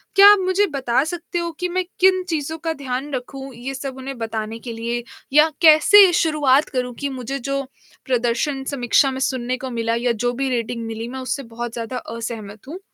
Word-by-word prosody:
क्या 400 +1 +9
आप 415 - +5
मुझे 380 +2 +3
बता 265 -3 0
सकते 345 +1 -4
हो 340 0 -3
कि 360 - 0
मैं 370 +1 0 0.2
किन 370 0 +4
चीज़ों 320 0 -2
का 325 0 -3
ध्यान 270 0 -4
रखूँ, 270 +1 -6
ये 255 +3 -6
सब 265 0 -6
उन्हें 265 0 -7
बताने 225 0 -4
के 235 0 -7
लिए 235 +1 -3 0.3
या 300 +2 +6
कैसे 355 +5 +8
शुरुआत 300 -4 +3
करूँ 250 -2 -2
कि 285 -1 -2
मुझे 265 +1 -5
जो 275 +2 -2 0.4
प्रदर्शन 255 +3 0
समीक्षा 265 +2 +3
में 260 - -5
सुनने 255 -1 -1
को 260 0 -6
मिला 230 0 -1
या 240 +1 +1
जो 245 +2 -1
भी 270 +2 -2
रेटिंग 235 -1 -2
मिली, 225 +1 -5
मैं 265 - -6
उससे 260 +2 -3
बहुत 235 0 -6
ज़्यादा 235 +2 -4
असहमत 225 -2 -7
हूँ। 350 +5 -7
260 Hz, 200 wpm, -21 LUFS, 235-300 Hz, 0.4 s, क्या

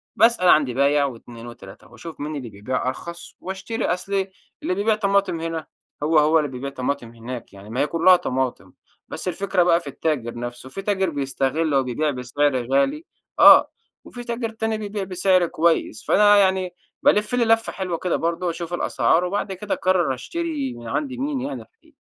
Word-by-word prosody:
باسأل 220 -5 +4
عند 150 -4 +5
بايع 140 +3 +2
و2 120 -2 -8
و3، 100 -3 -12
وأشوف 160 +6 -10
مين 150 +1 -4
اللي 130 -5 -6
بيبيع 120 +6 -3
أرخص 170 +6 -6
واشتري، 190 +5 -4
أصل 195 +1 -1 0.4
اللي 185 - 0
بيبيع 210 +3 +2
طماطم 200 -4 +1
هنا 165 -1 -4 0.4
هو 155 +1 +4
هو 155 +2 +4
اللي 150 -2 -1
بيبيع 130 +2 -5
طماطم 135 -2 -3
هناك 120 0 -8
يعني، 100 +1 -13
ما 120 +4 -4
هي 145 - +2
كلّها 170 +2 +5
طماطم، 130 -7 -3 0.3
بس - - -7
الفكرة 180 0 +1
بقى 170 -1 +4
في 160 - -13
التاجر 140 -4 -2
نَفسه، 120 +2 -7
في 195 - -6
تاجر 195 -2 0
بيستغل 140 +1 -1
أو 135 - +3
بيبيع 145 +5 -1
بسعر 130 0 -1
غالي، 285 - +1 0.3
آه، - - +8 0.3
وفي 245 -1 -9
تاجر 235 -1 -3
تاني 225 0 -2
بيبيع 205 -1 -4
بسعر 185 -1 +2
كويس، 160 -10 0
فأنا 205 0 +5
يعني 190 -2 +2 0.3
بالِفّ 210 +3 +3
لي 245 -1 +2
لَفّة 225 0 +2
حلوة 185 -3 -3
كده 180 +1 -1
برضو 170 +1 -1
أشوف 170 +1 -5
الأسعار، 175 0 +1
وبعد 195 +1 -2
كده 200 +2 -4
أقرر 180 -6 +1
أشتري 295 - -4
من 120 -1 -10
عند 275 - -2
مين 270 +1 -2
يعني 275 +3 -4
الحقيق 325 -9 -22
170 Hz, 180 wpm, -22 LUFS, 135-200 Hz, 0.4 s, آه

